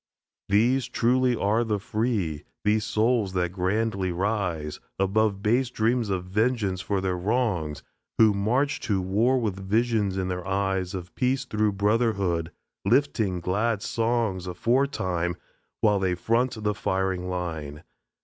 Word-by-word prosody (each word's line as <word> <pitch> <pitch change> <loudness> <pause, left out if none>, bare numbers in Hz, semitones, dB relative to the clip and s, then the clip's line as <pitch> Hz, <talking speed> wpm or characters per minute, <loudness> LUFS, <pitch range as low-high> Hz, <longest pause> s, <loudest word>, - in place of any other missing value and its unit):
These 120 +6 +3
truly 125 +1 +2
are 110 +2 +1
the 110 -2 0
Free, 100 -7 -1 0.2
These 105 +1 +2
souls 110 -3 +1
that 90 -2 0
grandly 95 +1 0
rise 90 -5 -2 0.2
Above 100 +1 +1
base 120 +4 +2
dreams 115 -1 0
of 95 -2 -1
vengeance 105 -1 0
for 100 0 -1
their 95 -1 0
wrongs, 90 - -1 0.3
Who 110 -2 +6
march 120 +8 +1
to 100 -3 0
war 110 +8 +2
with 105 -5 -2
visions 105 0 +1
in 95 -1 -1
their 90 0 -4
eyes 95 -1 -1
Of 90 -2 -7
Peace 130 +1 0
through 105 -4 0
Brotherhood, 100 -5 +1 0.3
lifting 110 -5 +1
glad 105 +4 0
songs 115 -6 0
Aforetime, 90 - 0 0.5
while 105 -2 +3
they 95 -2 +1
front 115 +4 0
the 105 0 +1
firing 95 -2 -1
line. 80 -5 -4
100 Hz, 135 wpm, -26 LUFS, 90-115 Hz, 0.5 s, Who